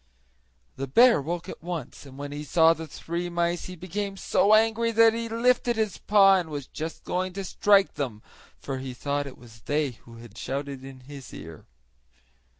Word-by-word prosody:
The 135 +1 -3
bear 235 - +6
woke 170 +4 -4
at - - -8
once, 165 -5 -6
and 135 0 -13
when 145 0 -6
he 145 +1 -5
saw 160 +2 +5
the 160 -1 -8
three 170 +3 -4
mice 170 0 -1
he 185 - -7
became 195 +3 -4
so 210 +2 +3
angry 225 +1 +2
that 225 0 +5
he 230 0 -3
lifted 240 +1 +2
his 215 -4 -1
paw 195 -2 +5
and 175 -3 -3
was 145 -3 -5
just 160 +4 -7
going 185 0 -2
to 195 +1 -4
strike 200 +1 +3
them, 125 -7 -4 0.4
for 135 -1 -5
he 130 -1 -6
thought 145 +2 -2
it 130 - -10
was 115 -2 -16
they 145 0 0
who 115 0 -16
had 115 -2 -13
shouted 140 0 -4
in 135 -1 -11
his 135 0 -11
ear. 80 0 -11
165 Hz, 190 wpm, -26 LUFS, 135-195 Hz, 0.4 s, bear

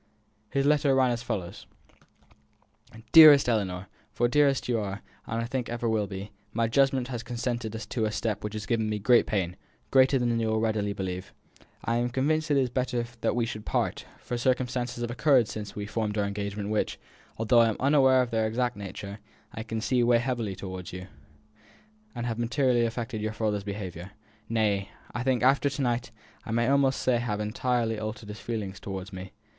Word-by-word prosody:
His 135 +3 0
letter 145 -2 +3
ran 130 -2 +4
as 120 -1 -2
follows: 105 -8 -5 1.4
"DEAREST 155 -4 +9
ELLINOR, 95 -6 0 0.3
for 120 - +1
dearest 140 +1 +2
you 120 -2 +1
are, 100 0 -5 0.2
and 115 - -2
I - - -1
think 125 0 -3
will - - -4
ever 110 -3 0
be, 95 +1 -7 0.2
my 115 0 +1
judgment 135 +1 +2
has 120 -3 -4
consented 120 -1 -3
to 110 0 -2
a 105 - -1
step 105 0 -2
which 105 0 -4
is 110 - -4
giving 110 -2 0
me 105 - -1
great 115 +4 +4
pain, 95 -4 -1 0.3
greater 135 0 +5
than 120 -2 +1
you 115 - 0
will 110 0 +1
readily 110 -2 0
believe. 95 -1 -5 0.5
I 115 0 +1
am 120 +1 0
convinced 150 +5 0
that 145 -2 +2
it - - +4
is 125 - -3
better 125 -1 -1 0.2
that - - +1
we 120 -1 +1
should 110 -2 -6
part; - - -1
for 120 - -5
circumstances 125 -1 -1
have 120 - -3
occurred 125 -1 +4
since 105 -1 -6
we 105 - -4
formed 105 0 -2
our 105 - +1
engagement 100 0 -4
which, 105 0 -1 0.4
although 115 +2 +4
I 115 -1 +5
am 110 - -3
unaware 130 -2 +5
of 120 - -6
their 110 -1 +1
exact 120 +2 -1
nature, 100 0 -7 0.3
I - - -5
can 110 0 -4
see 125 +1 +1
weigh 120 0 +4
heavily 120 -4 -2
upon 95 -1 -6
you, 90 0 -7 1.1
and 120 0 -3
have 115 -1 -3
materially 120 0 +2
affected 115 -1 -4
your 110 0 -2
father's 105 -2 -1
behaviour. 95 -2 -6 0.4
Nay, 105 -3 +1 0.2
I 120 - -3
think, 125 -2 +1
after 135 +2 +4
to 140 +1 -4
night, 120 -1 -1 0.3
I - - -12
may 115 +1 +1
almost 135 -1 +3
say 125 -2 +3
have 110 -3 -2
entirely 115 +1 -1
altered 110 0 -6
his 105 0 -7
feelings 100 -4 -4
towards 95 0 -6
me. 95 0 -8
115 Hz, 195 wpm, -27 LUFS, 105-125 Hz, 1.4 s, DEAREST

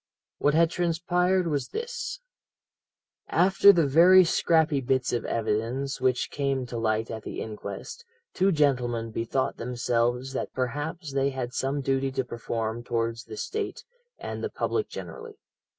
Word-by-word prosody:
"What 145 +1 +2
had 165 0 +4
transpired 180 +2 +1
was 145 -6 -1
this: - - -5 1.1
"After 190 +2 +6
the 170 -5 +3
very 175 +6 +7
scrappy 160 -4 +2
bits 130 0 0
of 120 - -1
evidence 115 +5 -2
which 130 -1 +1
came 135 -2 -1
to 120 -1 -6
light 110 0 0
at 110 - -5
the - - -6
inquest, 105 - -7 0.3
two 195 +1 +3
gentlemen 125 -7 +1
bethought 115 +4 -1
themselves 120 +1 -1
that - - -3
perhaps 145 +5 -3
they 135 0 +2
had 130 -2 -4
some 135 +2 -1
duty 135 0 0
to 130 - -1
perform 115 -1 -4
towards 115 0 -2
the 110 -1 -9
State 425 -1 -4 0.3
and - - -6
the - - -1
public 430 - -1
generally. 455 -3 -8
135 Hz, 145 wpm, -27 LUFS, 120-165 Hz, 1.1 s, very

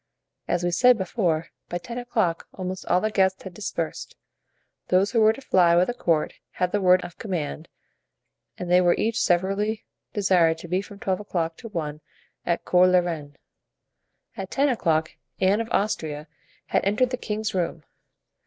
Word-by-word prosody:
As 175 0 0
we 175 - +1
said 250 +6 +5
before, 175 -5 -1 0.2
by 175 - -2
ten 235 +7 -6
o'clock 220 -9 -1
almost 185 0 -5
all 180 - +3
the 215 - 0
guests 190 -2 +1
had 190 - -8
dispersed; 170 -4 -4 0.7
those 190 +3 +3
who 230 -2 +2
were 215 0 +6
to 225 - -8
fly 180 -9 +4
with 175 +1 +5
the - - 0
court 165 -9 0 0.2
had 180 -1 -1
the 205 - 0
word 180 -1 +5
of 175 - -11
command 170 -5 -4 0.9
and 175 -1 -5
they 180 0 +6
were 175 -1 +4
each 225 +2 0
severally 195 +5 0 0.3
desired 180 -5 +3
to 165 - -10
be 180 +3 0
from 200 0 -12
twelve 190 -2 -1
o'clock 170 -5 -2
to 235 - -9
one 155 -7 -4 0.5
at 170 -1 0
Cours 180 0 +5
la 180 - +6
Reine. 155 -5 -2 1.0
At 195 -1 -6
ten 280 +1 +2
o'clock 160 -10 +1 0.3
Anne 195 +4 +3
of 230 - -5
Austria 155 -7 -1 0.4
had - - 0
entered 215 +6 +1
the - - 0
king's 215 -2 -3
room. 170 -3 -2
185 Hz, 175 wpm, -25 LUFS, 170-210 Hz, 1.0 s, were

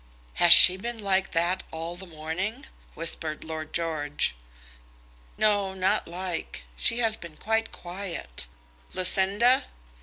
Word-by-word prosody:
"Has 175 -1 +6
she 185 0 +10
been 235 +4 -5
like 195 -2 -1
that 175 +2 0
all 165 +2 -6
the 190 +1 -12
morning?" 175 - -5 0.3
whispered 160 -1 0
Lord 155 -1 -7
George. 155 - -2 1.0
"No; 205 -3 0
not 190 0 -1
like. 175 - -6
She 230 - -1
has 225 -2 +4
been 170 -6 -12
quite 225 +1 -1
quiet. 175 - -7 0.5
Lucinda!" 200 +7 +3
180 Hz, 120 wpm, -25 LUFS, 160-200 Hz, 1.0 s, she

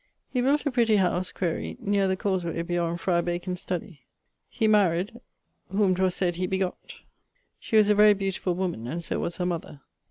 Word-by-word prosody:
He 250 - +1
built 285 +4 +2
a 285 - +1
pretty 235 -3 +3
house 185 -2 +1
(quaere) 170 -4 -3
neer 200 -1 +1
the 190 0 0
cawsey 180 -4 -1
beyond 170 0 -1
Friar 170 -1 +1
Bacon's 175 +1 -3
studie. 180 -3 -5 0.5
He 220 - 0
married[CT]..., 205 +2 +2 0.5
whom 195 0 +2
'twas 185 0 +1
sayd 175 -2 0
he 185 0 -1
begott. 190 -1 -3 0.6
She 220 - 0
was 210 -1 +6
a - - +6
very 210 0 +6
beautifull 195 -2 -2
woman, 175 -11 -3
and 170 +6 -4
so - - -3
was 170 - -3
her 180 - -1
mother. 170 -5 -4
185 Hz, 185 wpm, -26 LUFS, 175-205 Hz, 0.6 s, was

